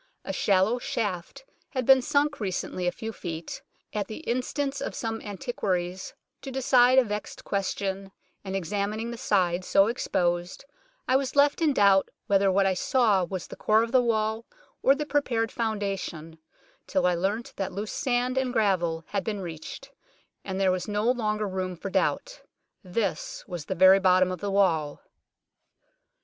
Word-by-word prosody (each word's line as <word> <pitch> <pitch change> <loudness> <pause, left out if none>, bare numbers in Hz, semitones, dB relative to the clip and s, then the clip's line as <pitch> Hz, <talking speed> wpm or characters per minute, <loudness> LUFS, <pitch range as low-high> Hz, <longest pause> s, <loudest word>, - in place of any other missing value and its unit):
A - - -3
shallow 200 +4 +2
shaft 205 - -4 0.2
had 255 -2 -3
been 265 0 +7
sunk 290 +3 +1
recently 185 -2 -3
a - - +2
few 225 +3 -6
feet, 165 -4 -6 0.3
at 205 -2 -2
the 220 - -7
instance 275 +1 -2
of - - -4
some 225 -1 -3
antiquaries, 190 -4 -3 0.3
to 270 - -7
decide 255 -1 +4
a 265 - +7
vexed 210 -2 -5
question, 195 0 -3 0.3
and 190 -1 -4
examining 205 +5 -2
the 235 - -6
side 185 -6 +1
so 195 +1 +4
exposed, 175 -3 -1 0.4
I 255 - +3
was 270 0 -3
left 285 +2 +4
in 315 -2 +4
doubt 200 -6 +4 0.2
whether 195 -1 +3
what 195 +1 +3
I 190 - +3
saw 210 -1 +2
was 180 0 -4
the - - -10
core 215 +1 +3
of 230 - -4
the 255 -1 +5
wall 220 -1 0 0.4
or 270 - +5
the 300 +1 -3
prepared 245 -6 0
founda 205 -4 -2
tion, 160 -2 -8 0.5
till 280 - +1
I 180 - +3
leamt 200 +7 -2
that 195 - -2
loose 205 +3 -5
sand 255 -1 0
and 260 -1 -1
gravel 180 -8 +1
had 200 -2 -1
been 210 0 -3
reached, 175 - -8 0.5
and 190 0 -4
there 190 -1 +3
was 185 +2 -2
no 210 +3 +1
longer 215 -4 -1
room 185 -1 -3
for 190 +3 -6
doubt. - - -1 0.4
This 195 +2 -3
was 175 -5 -6
the - - -3
very 190 +2 +7
bottom 185 -1 +4
of 185 - -4
the 200 - -3
wall. 165 -7 +1
205 Hz, 170 wpm, -27 LUFS, 185-245 Hz, 0.5 s, been